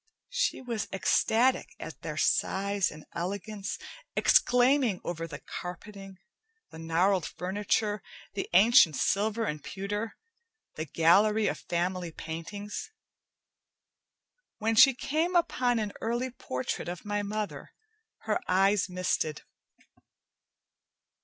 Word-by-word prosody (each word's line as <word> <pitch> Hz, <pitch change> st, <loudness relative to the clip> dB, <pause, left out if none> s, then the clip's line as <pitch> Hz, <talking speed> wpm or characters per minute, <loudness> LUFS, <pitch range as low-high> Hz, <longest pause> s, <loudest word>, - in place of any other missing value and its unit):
She -, -, 0 dB
was 235 Hz, -4 st, -3 dB
ecstatic 230 Hz, +6 st, +2 dB
at -, -, -8 dB
their -, -, -5 dB
size 200 Hz, 0 st, +1 dB
and 150 Hz, 0 st, -12 dB
elegance, 200 Hz, +4 st, -4 dB, 0.4 s
exclaiming 250 Hz, -4 st, +4 dB
over 165 Hz, -1 st, -4 dB
the 150 Hz, -, -7 dB
carpeting, 195 Hz, +2 st, -8 dB, 0.5 s
the 160 Hz, -, -10 dB
gnarled 170 Hz, +3 st, +1 dB
furniture, 205 Hz, +2 st, -1 dB, 0.3 s
the 200 Hz, -, -4 dB
ancient 190 Hz, -, +7 dB
silver 215 Hz, -, +1 dB
and 150 Hz, -6 st, -4 dB
pewter, 205 Hz, +3 st, -4 dB, 0.6 s
the 155 Hz, -, -4 dB
gallery 205 Hz, +8 st, +4 dB
of -, -, -1 dB
family 175 Hz, 0 st, -2 dB
paintings. 165 Hz, -, -6 dB, 1.7 s
When 225 Hz, +1 st, 0 dB
she 265 Hz, +3 st, +7 dB
came 320 Hz, +8 st, -1 dB
upon 250 Hz, -8 st, +2 dB
an 210 Hz, -2 st, -2 dB
early 240 Hz, +3 st, -1 dB
portrait 130 Hz, -, -4 dB
of 175 Hz, +2 st, -7 dB
my 205 Hz, 0 st, -1 dB
mother, 210 Hz, 0 st, -4 dB, 0.5 s
her 215 Hz, -1 st, -1 dB
eyes 195 Hz, +1 st, +3 dB
misted. 180 Hz, -4 st, -1 dB
200 Hz, 105 wpm, -29 LUFS, 180-220 Hz, 1.7 s, ancient